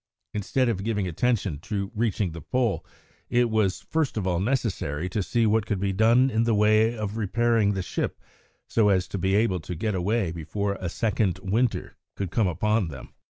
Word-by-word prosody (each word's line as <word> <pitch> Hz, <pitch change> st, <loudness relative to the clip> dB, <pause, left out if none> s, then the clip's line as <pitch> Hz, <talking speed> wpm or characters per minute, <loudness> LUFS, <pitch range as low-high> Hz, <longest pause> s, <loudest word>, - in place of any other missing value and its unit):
Instead 115 Hz, +5 st, 0 dB
of 100 Hz, -5 st, -1 dB
giving 105 Hz, -3 st, -1 dB
attention 95 Hz, -3 st, 0 dB
to 100 Hz, +3 st, -4 dB
reaching 105 Hz, -4 st, 0 dB
the 85 Hz, 0 st, -8 dB
Pole, 125 Hz, -, 0 dB, 0.5 s
it 120 Hz, -1 st, +2 dB
was 100 Hz, -4 st, +1 dB
first 155 Hz, +5 st, -1 dB
of 100 Hz, -, -1 dB
all 90 Hz, -2 st, +1 dB
necessary 95 Hz, -, -1 dB
to 100 Hz, +3 st, -2 dB
see 115 Hz, +4 st, +1 dB
what 110 Hz, 0 st, +2 dB
could 105 Hz, -3 st, -1 dB
be 100 Hz, 0 st, 0 dB
done 115 Hz, +6 st, +4 dB
in 115 Hz, 0 st, +2 dB
the 115 Hz, -1 st, +2 dB
way 110 Hz, +2 st, +3 dB
of 105 Hz, 0 st, -3 dB
repairing 115 Hz, -1 st, +2 dB
the 95 Hz, -, -2 dB
ship -, -, -3 dB, 0.5 s
so 110 Hz, -3 st, +3 dB
as 95 Hz, -2 st, +2 dB
to 100 Hz, -, -4 dB
be 95 Hz, +2 st, +1 dB
able 100 Hz, -4 st, +2 dB
to 85 Hz, +2 st, -6 dB
get 105 Hz, +6 st, -1 dB
away 95 Hz, 0 st, 0 dB
before 100 Hz, +5 st, -2 dB
a 90 Hz, -, -2 dB
second 105 Hz, -2 st, 0 dB
winter 110 Hz, +5 st, 0 dB, 0.2 s
could 95 Hz, -3 st, -4 dB
come 105 Hz, +1 st, +2 dB
upon 105 Hz, +3 st, +1 dB
them. 70 Hz, -5 st, -9 dB
105 Hz, 195 wpm, -26 LUFS, 95-115 Hz, 0.5 s, done